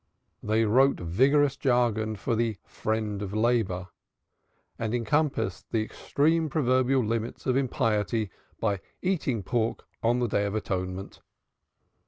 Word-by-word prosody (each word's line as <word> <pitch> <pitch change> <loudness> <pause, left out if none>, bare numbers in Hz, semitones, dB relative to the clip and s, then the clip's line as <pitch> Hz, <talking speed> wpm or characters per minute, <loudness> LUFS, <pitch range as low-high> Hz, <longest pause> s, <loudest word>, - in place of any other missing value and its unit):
They 110 +1 +2
wrote 130 +6 +4
vigorous 135 - +3
jargon 115 -4 +1
for 105 +3 -1
the 115 -2 0
Friend 110 -2 -2
of 100 0 -4
Labor 110 -6 +1 0.9
and 115 +1 -1
compassed 140 - 0
the 110 -1 +1
extreme 160 +7 +1
proverbial 130 -3 +2
limits 115 +1 -3
of 130 - +2
impiety 110 -5 0 0.3
by 100 -3 0 0.2
"eating 140 - 0
pork 115 +2 -1 0.2
on 120 +2 +2
the 125 -1 +1
Day 100 -1 +1
of 100 +1 -2
Atonement." 95 -2 -4
115 Hz, 125 wpm, -27 LUFS, 105-130 Hz, 0.9 s, wrote